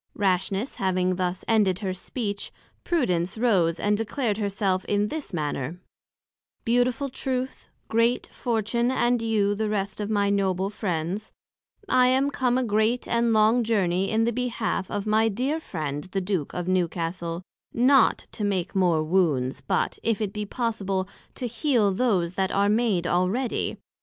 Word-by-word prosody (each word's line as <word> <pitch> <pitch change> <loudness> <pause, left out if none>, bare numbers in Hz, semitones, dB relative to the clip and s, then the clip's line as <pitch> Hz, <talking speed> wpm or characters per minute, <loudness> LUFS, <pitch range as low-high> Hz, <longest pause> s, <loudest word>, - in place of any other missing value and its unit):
Rashness 195 +4 0
having 185 -1 +1
thus 180 0 -2
ended 210 -5 +3
her 185 - -1
Speech, 205 +1 -4 0.3
Prudence 190 - 0
rose 185 -8 +2
and 210 0 +2
declared 225 0 -1
her 205 -2 0
self 190 -2 0
in 205 0 +1
this 315 -7 -5
manner: 150 -1 -3 0.9
Beautiful 245 +3 +2
Truth, 260 0 -4 0.2
Great 230 +2 +2
Fortune, 235 +1 0
and 245 -2 +2
you 215 -3 +1
the 215 +1 -1
rest 200 -1 -2
of 205 - -3
my 200 -2 +2
noble 195 -1 0
Friends; 185 +1 -3 0.6
I 250 -6 +4
am 265 +2 +2
come 250 -3 +1
a 260 - +1
great 220 +2 +1
and 235 0 +2
long 220 +2 +4
journey 195 -4 +1
in 220 +1 +2
the 235 +1 +1
behalf 235 -5 -2
of 205 0 -3
my 220 +1 +3
dear 260 +9 -1
Friend 150 - -4
the 190 +1 -3
Duke 185 -5 -2
of 180 -1 -4
Newcastle; 170 -1 -1 0.3
not 260 +1 +4
to 215 - -5
make 195 -3 -1
more 175 -5 +3
wounds, 150 -7 +1
but, 130 - -1
if 225 -3 0
it 205 -3 -2
be 210 -1 -4
possible, 200 -6 -2 0.3
to 255 - -4
heal 230 -3 +1
those 185 -6 +1
that 190 0 0
are 200 +1 +2
made 210 -5 +2
already. 185 +9 0
205 Hz, 155 wpm, -25 LUFS, 185-235 Hz, 0.9 s, I